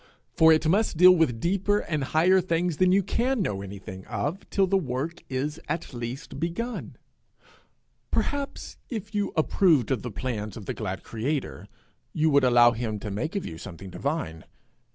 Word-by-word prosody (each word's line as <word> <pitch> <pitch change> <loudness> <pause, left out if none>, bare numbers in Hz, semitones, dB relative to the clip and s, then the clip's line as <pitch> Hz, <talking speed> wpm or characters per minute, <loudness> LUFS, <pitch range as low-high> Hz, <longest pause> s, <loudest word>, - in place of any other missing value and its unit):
For 160 0 +6
it 155 0 +3
must 195 0 +2
deal 180 +2 +9
with 160 -10 +2
deeper 195 - +1
and 155 -8 -2
higher 180 +6 +4
things 170 -2 0
than 185 0 +4
you 195 +1 +4
can 250 +6 0
know 100 - -1
anything 95 -1 -8
of 140 - -3
till 195 - +3
the 190 +1 +1
work 150 -1 -2
is 145 +4 -2
at 160 -2 -3
least 125 +4 -6
begun. 175 +10 -4 1.1
Perhaps 285 -1 -2
if 215 -3 -5
you 205 -1 0
approved 155 - +3
of 125 -5 0
the 125 - -5
plans 110 -2 -4
of 105 - -9
the - - -3
glad 95 -4 -5
creator, 115 - -3 0.5
you 155 0 +2
would 140 -1 +4
allow 120 -1 +6
him 115 -2 -3
to 105 0 -6
make 120 - -3
of 200 - -2
you 80 - -7
something 95 0 -9
divine! 135 - -3
150 Hz, 175 wpm, -26 LUFS, 115-180 Hz, 1.1 s, deal